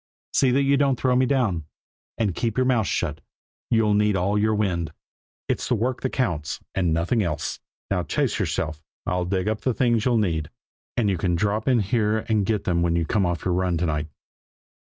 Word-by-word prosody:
See 135 - +4
that 135 +3 +3
you 140 0 +3
don't 135 -3 +2
throw 130 -1 +2
me 130 0 +3
down. 110 - +1 0.5
And 105 -5 0
keep 115 +5 -2
your 130 - +3
mouth 120 -5 +2
shut; 75 -3 -2 0.5
you'll 110 -2 +3
need 105 0 +3
all 95 +3 +1
your 110 +1 +2
wind. 85 -6 -1 0.6
It's - - -2
work 120 +2 0
that 130 - 0
counts, 85 - -2
and 90 -4 +1
nothing 85 +8 +1
else. 85 -6 -2 0.3
Now - - +2
chase - - -1
yourself! 80 0 -2 0.2
I'll 90 0 0
dig 95 +1 -1
up 110 0 -1
the 130 -3 0
things 120 -4 +2
you'll 125 -2 +3
need, 80 -8 0 0.5
and 115 -4 +2
you 95 -4 0
can 90 0 +1
drop 105 +4 0
in 125 -4 +4
here 105 +1 0
and 105 -3 +2
get 105 -3 0
them 85 -2 +1
when 85 -1 +1
you 85 -1 +1
come 100 +1 +1
off 85 -1 -3
your 90 - +1
run 90 -1 +1
to 85 - 0
night." 75 -2 -1
105 Hz, 205 wpm, -24 LUFS, 85-120 Hz, 0.6 s, See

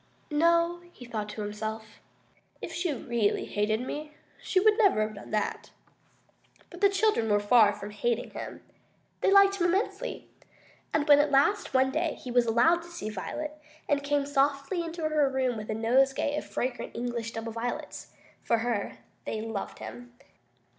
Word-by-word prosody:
"No," 335 +3 +3
he 245 - -12
thought 215 -3 -4
to 210 0 -5
himself, 215 +1 -6 0.6
"if - - -7
she 345 -2 -1
really 235 -5 0
hated 215 +2 0
me, 300 +4 -6 0.3
she 375 - +1
would 425 +2 +5
never 395 - +4
have 215 0 -4
done 200 - -11
that." 210 -1 -2 1.0
But - - -11
the 400 - +6
children 390 - +1
were 205 - +4
very 205 0 -4
far 215 -3 +6
from 205 +1 -8
hating 235 +3 -1
him. - - -8 0.6
They - - +2
liked 395 0 +6
him 350 -2 +2
immensely. 385 +6 -2 0.6
And 305 0 0
when 290 -1 +8
at 295 0 +3
last, 280 +3 +2
one 265 0 +4
day, - - -1
he 250 - -8
was 240 -1 +3
allowed 245 +10 +4
to 340 - -12
see 215 -11 -5
Violet, 300 +10 -5 0.3
and 285 -1 +1
came 285 0 0
softly 280 +4 +1
into 330 -1 -3
her 300 -3 +2
room 260 -2 0
with 215 -1 -7
a 215 - -1
nosegay 265 +5 +2
of - - -3
fragrant 255 0 -3
English 235 -1 -3
double 225 0 -5
violets, 230 +2 -5 0.3
for 230 - +1
her, 225 -3 -2 0.3
they 220 - -3
loved 220 -2 -5
him. 245 0 -9
255 Hz, 175 wpm, -28 LUFS, 225-310 Hz, 1.0 s, when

